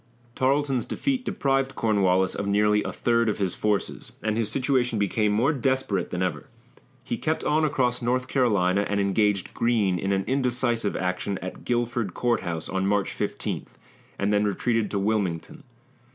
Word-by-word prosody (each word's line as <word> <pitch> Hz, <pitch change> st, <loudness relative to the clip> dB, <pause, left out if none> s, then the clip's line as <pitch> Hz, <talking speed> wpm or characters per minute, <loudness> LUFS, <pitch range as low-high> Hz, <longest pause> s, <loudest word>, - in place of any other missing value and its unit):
Tarleton's 135 Hz, -1 st, +1 dB
defeat 265 Hz, -3 st, -1 dB
deprived 135 Hz, -5 st, 0 dB
Cornwallis 95 Hz, -4 st, +2 dB
of 100 Hz, -, -3 dB
nearly 105 Hz, +1 st, +3 dB
a -, -, -3 dB
third 115 Hz, -1 st, +1 dB
of 105 Hz, -, -1 dB
his 95 Hz, -3 st, 0 dB
forces, 105 Hz, -2 st, -2 dB
and 110 Hz, -1 st, 0 dB
his 110 Hz, -2 st, 0 dB
situation 125 Hz, -1 st, +1 dB
became 105 Hz, +1 st, +1 dB
more 120 Hz, +9 st, +2 dB
desperate 130 Hz, -7 st, 0 dB
than 90 Hz, +1 st, -2 dB
ever. 90 Hz, -, -3 dB, 0.6 s
He -, -, -3 dB
kept 160 Hz, +1 st, -1 dB
on 155 Hz, +1 st, +2 dB
across 130 Hz, -5 st, +1 dB
North 125 Hz, +1 st, 0 dB
Carolina 100 Hz, -8 st, +2 dB
and 100 Hz, 0 st, 0 dB
engaged 100 Hz, -1 st, +1 dB
Greene 105 Hz, -6 st, +1 dB
in 95 Hz, +2 st, -1 dB
an 95 Hz, 0 st, +1 dB
indecisive 125 Hz, -4 st, 0 dB
action 90 Hz, +2 st, -2 dB
at 95 Hz, -, -8 dB
Guilford 120 Hz, -5 st, -1 dB
Court 120 Hz, -2 st, +1 dB
House 80 Hz, -2 st, -4 dB
on 95 Hz, 0 st, -1 dB
March 100 Hz, -1 st, +1 dB
15, -, -, -3 dB, 0.5 s
and 100 Hz, +1 st, 0 dB
then 105 Hz, 0 st, +3 dB
retreated 110 Hz, +2 st, 0 dB
to 100 Hz, -, -2 dB
Wilmington. 100 Hz, -, -1 dB
110 Hz, 165 wpm, -25 LUFS, 100-125 Hz, 0.6 s, nearly